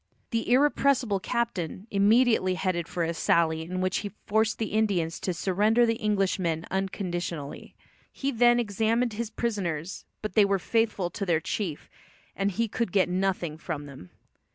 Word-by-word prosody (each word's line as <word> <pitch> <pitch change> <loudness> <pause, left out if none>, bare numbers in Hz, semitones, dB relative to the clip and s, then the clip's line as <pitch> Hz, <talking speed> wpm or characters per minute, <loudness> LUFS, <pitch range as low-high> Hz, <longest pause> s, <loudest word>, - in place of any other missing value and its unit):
The 230 -1 -1
irrepressible 260 -5 +3
Captain 200 -5 -2
immediately 210 -1 +4
headed 180 -3 -1
a 170 -1 -1
sally 160 -1 +2
in 185 +3 -4
which 185 0 0
he 205 - -3 0.2
forced 220 +1 +1
the 220 -2 -3
Indians 190 -7 +1
to 185 - -2
surrender 205 +7 +2
the 230 -1 -1
Englishmen 190 -5 0
unconditionally. 175 -6 -4 0.4
He 275 0 -2
then 240 0 +4
examined 225 +2 0
his 225 +1 -3
prisoners, 190 -8 -3 0.2
but 215 - -3
they 210 - +6
were 200 0 +2
faithful 210 -3 0
to 205 - -4
their 170 -4 +2
chief, 165 -1 -4 0.5
and 195 0 0
he 230 +4 -1
could 225 -1 -2
get 190 -2 +3
nothing 180 -4 -1
from 155 -4 -5
them. 135 -10 -11
195 Hz, 155 wpm, -27 LUFS, 175-225 Hz, 0.5 s, they